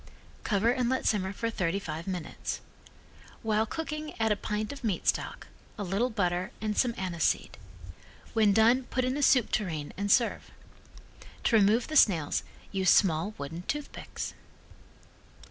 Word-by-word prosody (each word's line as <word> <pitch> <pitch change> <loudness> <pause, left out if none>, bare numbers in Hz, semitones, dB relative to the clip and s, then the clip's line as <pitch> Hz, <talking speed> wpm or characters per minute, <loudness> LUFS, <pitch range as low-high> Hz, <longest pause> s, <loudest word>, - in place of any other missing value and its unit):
Cover 215 +2 +2
and 250 -1 0
let 260 - 0
simmer 190 -3 +1
for 230 +3 -3
thirty 185 -3 0
five 170 -3 -5
minutes. 180 -4 -4 0.8
While 220 0 +1
cooking 305 +1 -5
add 220 -1 +2
a - - +4
pint 210 +1 -3
of 275 - -11
meat 205 -6 -1
stock, - - 0 0.3
a 205 - -3
little 200 +7 0
butter 180 -5 0
and 215 -1 -2
some 240 0 +2
anise 180 -3 -2
seed. - - +1 0.8
When 215 -2 +4
done 230 +5 +4
put 255 0 -1
in 255 +1 0
a 290 - -2
soup 255 -4 +4
tureen 160 -8 -2
and 200 +1 0
serve. 235 +1 +2 0.9
To - - +3
remove 215 +3 +4
the 310 - -5
snails 165 - +4 0.3
use 190 -2 +2
small 190 +2 +3
wooden 160 +5 -6
toothpicks. 295 0 -5
210 Hz, 155 wpm, -29 LUFS, 190-235 Hz, 0.9 s, a